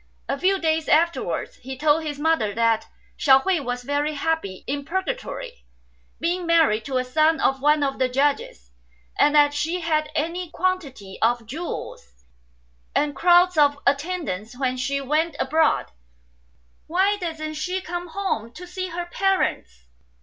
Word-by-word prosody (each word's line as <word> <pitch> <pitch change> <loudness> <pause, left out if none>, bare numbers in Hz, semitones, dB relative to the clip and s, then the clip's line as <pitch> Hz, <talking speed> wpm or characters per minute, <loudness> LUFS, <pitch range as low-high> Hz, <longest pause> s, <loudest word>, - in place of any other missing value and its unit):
A - - 0
few 385 +4 +3
days 320 -2 0
after 335 +2 +3
wards - - -4
he 265 +1 -8
told 305 +3 +2
his 295 -2 -4
mother 295 -9 +1
that 230 -1 +2 0.3
Hsiao 270 -2 +6
hui 380 -3 +2
was 245 -2 -4
very 290 +3 -1
happy 290 - -2
in 285 +1 -3
Purgatory, 475 - -4 0.6
being 350 +1 -1
married 310 -11 +3
to 265 -2 -1
a 255 - +1
son 310 +5 +2
of 270 0 +1
one 295 +1 +3
of 270 -1 -2
the 260 -1 +2
Judges; 255 - -1 0.5
and 295 - +4
that 290 -1 +5
she 325 +5 -1
had 310 -2 0
any 335 +3 -2
quantity 315 - -3
of 235 0 +2
jewels, 315 +10 -6 0.9
3 - - +4
and 290 -1 -4
crowds 350 +2 +4
of 290 -1 +4
attendants 280 - -2
when 255 -1 0
she 275 +2 -1
went 305 +4 0
abroad. 315 +4 +1 1.0
"Why 385 +5 +2
doesn't 320 -4 -4
she 360 +5 -2
come 350 0 -5
home 325 - -3
to 360 - -9
see 370 +1 -5
her 350 0 -4
parents 345 - -1
305 Hz, 155 wpm, -23 LUFS, 265-345 Hz, 1.0 s, Hsiao